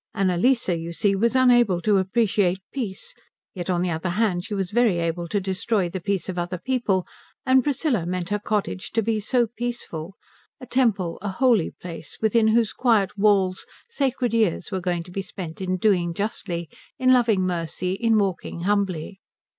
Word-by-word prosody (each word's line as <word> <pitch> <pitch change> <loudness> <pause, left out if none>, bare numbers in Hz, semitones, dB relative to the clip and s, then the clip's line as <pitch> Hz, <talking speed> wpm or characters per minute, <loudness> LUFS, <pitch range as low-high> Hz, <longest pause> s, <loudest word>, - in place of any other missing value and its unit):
Annalise, 195 +5 +2
you 170 -1 -2
see, 195 +3 +1
was 235 +5 +1
unable 240 -7 +4
to 205 +1 +3
appreciate 195 -2 +1 0.2
peace, 220 -9 -5 0.4
yet 180 -1 -5
on 175 -1 +1
the 180 - -1
other 160 +3 -2
hand 180 -2 0
she 210 +1 -5
was 190 -2 -2
very 230 -5 +3
able 170 +1 -2
to 200 +5 0
destroy 190 0 -1
the 185 +1 -5
peace 195 -1 -2
of 180 -2 -3
other 175 +1 -3
people; 215 -4 0 0.4
and 260 0 +4
Priscilla 270 - 0
meant 180 0 -3
her 210 0 0
cottage 205 - -2
to 225 - +1
be 220 0 0
so 240 +3 +2
peaceful 225 -7 -5 0.4
a 255 - -9
temple, 220 -9 0
a 205 - -3
holy 225 -3 +2
place, 165 -3 -8
within 220 0 +3
whose 225 -1 +2
quiet 225 -7 +2
walls 195 -3 +2 0.2
sacred 260 - 0
years 215 -4 +1
were 190 -1 -2
going 175 -1 -1
to 180 - -14
be 195 - -3
spent 185 -3 -8
in 185 0 -1
doing 175 -4 +1
justly, 185 -5 -3 0.3
in 255 -2 +4
loving 230 -6 +3
mercy, 180 +1 -2
in 225 +2 +2
walking 190 -4 -2
humbly. 190 -2 -1
195 Hz, 180 wpm, -24 LUFS, 180-230 Hz, 0.4 s, unable